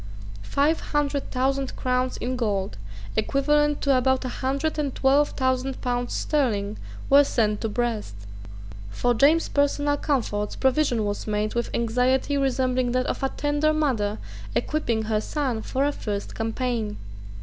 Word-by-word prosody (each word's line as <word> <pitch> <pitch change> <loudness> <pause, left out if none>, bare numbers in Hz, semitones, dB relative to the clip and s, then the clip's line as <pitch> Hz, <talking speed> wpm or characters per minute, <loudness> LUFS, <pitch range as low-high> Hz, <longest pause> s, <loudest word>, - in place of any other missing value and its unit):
Five 285 - +1
hundred 290 -1 -1
thousand 270 +1 -1
crowns 255 0 0
in 255 +2 -2
gold, 205 - -1 0.4
equivalent 295 +6 +2
to 275 -2 +3
about 260 +1 +2
a - - -2
hundred 275 +5 -2
and 285 -3 -2
twelve 280 +2 +3
thousand 260 0 0
pounds 245 -1 -2
sterling, 215 -8 0 0.3
were 280 +1 +7
sent 215 -6 0
to 225 - -1
Brest, 225 - -2 0.7
For 245 - +1
James's 295 +8 +4
personal 290 0 +1
comforts 220 -8 -1
provision 260 -4 +1
was 205 +1 -3
made 210 0 -1
with 235 0 -1
anxiety 250 +4 +1
resembling 255 -2 +1
that 255 0 +1
of - - -3
a 270 - +1
tender 290 +2 +1
mother 235 -9 0 0.4
equipping 235 -8 0
her 215 -1 0
son 260 -4 -2
for 265 +5 -1
a 290 - +2
first 205 -7 -4
campaign. 225 -1 -2
255 Hz, 145 wpm, -25 LUFS, 225-280 Hz, 0.7 s, were